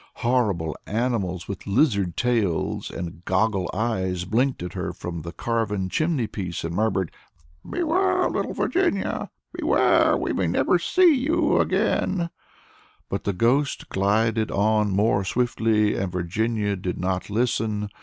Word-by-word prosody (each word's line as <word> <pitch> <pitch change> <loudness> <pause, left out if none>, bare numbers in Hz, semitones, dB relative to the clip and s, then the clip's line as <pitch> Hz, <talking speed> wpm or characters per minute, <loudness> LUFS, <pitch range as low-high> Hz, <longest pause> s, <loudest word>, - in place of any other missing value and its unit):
Horrible 100 - +1
animals 105 -6 -1
with 100 0 -7
lizard 100 - +2
tails 115 -9 0
and 85 -1 -7
goggle 95 0 +1
eyes 95 -5 -1
blinked 120 +2 0
at 90 -1 -6
her - - -3
from 85 -2 -6
the 85 +2 -7
carven 105 -2 -1
chimney 155 - 0
piece, 90 -5 -5
and 85 +1 -3
murmured, 95 -4 0 0.6
"Beware! 350 +3 +1
little - - -2
Virginia, 345 - 0 0.2
beware! - - +3
we - - -2
may - - 0
never - - +2
see 365 -3 +4
you 300 +4 +2
again," 170 -3 +1 0.8
but - - -3
the 100 - 0
ghost 125 +9 +1
glided 110 +3 +1
on 105 +1 +2
more 100 0 +2
swiftly, 110 -1 +1
and 95 -2 -2
Virginia 105 +4 -1
did 90 -1 -4
not 90 +1 -2
listen. 110 -2 0
105 Hz, 135 wpm, -24 LUFS, 95-120 Hz, 0.8 s, see